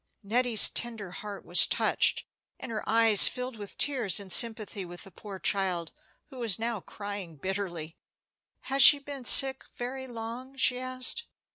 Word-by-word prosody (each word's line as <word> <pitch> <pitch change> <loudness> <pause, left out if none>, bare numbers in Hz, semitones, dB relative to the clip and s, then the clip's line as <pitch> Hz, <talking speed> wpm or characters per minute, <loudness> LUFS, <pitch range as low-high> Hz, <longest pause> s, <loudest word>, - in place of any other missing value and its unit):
Nettie's 235 +1 +5
tender 225 -6 -4
heart 205 +2 -10
was 175 - +5
touched, - - 0 0.3
and 235 - -9
her 220 - -6
eyes 225 -2 +5
filled 250 -1 -6
with 205 -2 -11
tears 245 - -1
in 195 -2 -10
sympathy 220 -2 +1
with 175 0 -11
the 195 - -14
poor 200 0 -11
child, 185 -3 -2 0.4
who 260 - -12
was 225 -6 -1
now 230 -1 -4
crying 200 -5 -9
bitterly. 175 -1 -7 0.6
"Has 275 +1 -2
she 290 - +8
been 280 -2 -10
sick 265 +2 +6
very 260 +2 -7
long?" 240 +3 -9
she 250 -1 +2
asked. 255 - -3
225 Hz, 155 wpm, -27 LUFS, 195-255 Hz, 0.6 s, she